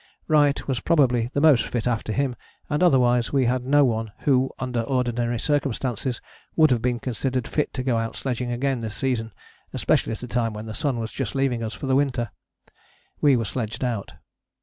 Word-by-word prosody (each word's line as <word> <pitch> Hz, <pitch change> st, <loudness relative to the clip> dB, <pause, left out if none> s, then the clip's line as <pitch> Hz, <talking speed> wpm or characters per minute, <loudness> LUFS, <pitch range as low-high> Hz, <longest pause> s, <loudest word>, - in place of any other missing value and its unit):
Wright 145 Hz, -3 st, +3 dB
was 130 Hz, -3 st, 0 dB
probably 125 Hz, -6 st, +2 dB
the 140 Hz, -, +1 dB
most 145 Hz, -6 st, +5 dB
fit 120 Hz, -2 st, -2 dB
after 115 Hz, -3 st, -1 dB
him, 130 Hz, +1 st, 0 dB, 0.4 s
and 150 Hz, -, +1 dB
otherwise 125 Hz, -8 st, +4 dB
we 135 Hz, -2 st, +2 dB
had 125 Hz, +1 st, 0 dB
no 145 Hz, +1 st, +5 dB
one 110 Hz, -3 st, -1 dB
who, 130 Hz, -2 st, +3 dB
under 125 Hz, -2 st, -2 dB
ordinary 120 Hz, -1 st, 0 dB
circumstances, 130 Hz, -3 st, -1 dB, 0.4 s
would 155 Hz, -3 st, +5 dB
have 120 Hz, -3 st, +2 dB
been 120 Hz, 0 st, 0 dB
considered 125 Hz, +1 st, -2 dB
fit 150 Hz, -, -1 dB
to 130 Hz, -, -2 dB
go 125 Hz, -3 st, +1 dB
out 115 Hz, 0 st, -2 dB
sledging 125 Hz, -2 st, -3 dB
again 130 Hz, +1 st, 0 dB
this 110 Hz, -2 st, -5 dB
season, 120 Hz, -4 st, -1 dB, 0.4 s
especially -, -, +1 dB
at 110 Hz, -, -7 dB
a -, -, -5 dB
time 115 Hz, -1 st, -1 dB
when 105 Hz, +1 st, -7 dB
the 110 Hz, -, -6 dB
sun 140 Hz, -1 st, -1 dB
was 115 Hz, 0 st, -4 dB
just 135 Hz, -1 st, -4 dB
leaving 135 Hz, -3 st, +1 dB
us 110 Hz, -1 st, -4 dB
for 145 Hz, -, -6 dB
the 135 Hz, 0 st, +2 dB
winter. 130 Hz, -5 st, 0 dB, 0.9 s
We 140 Hz, -3 st, +5 dB
were 115 Hz, -, -1 dB
sledged 115 Hz, +3 st, -4 dB
out. 115 Hz, -5 st, -2 dB
125 Hz, 195 wpm, -24 LUFS, 115-135 Hz, 0.9 s, most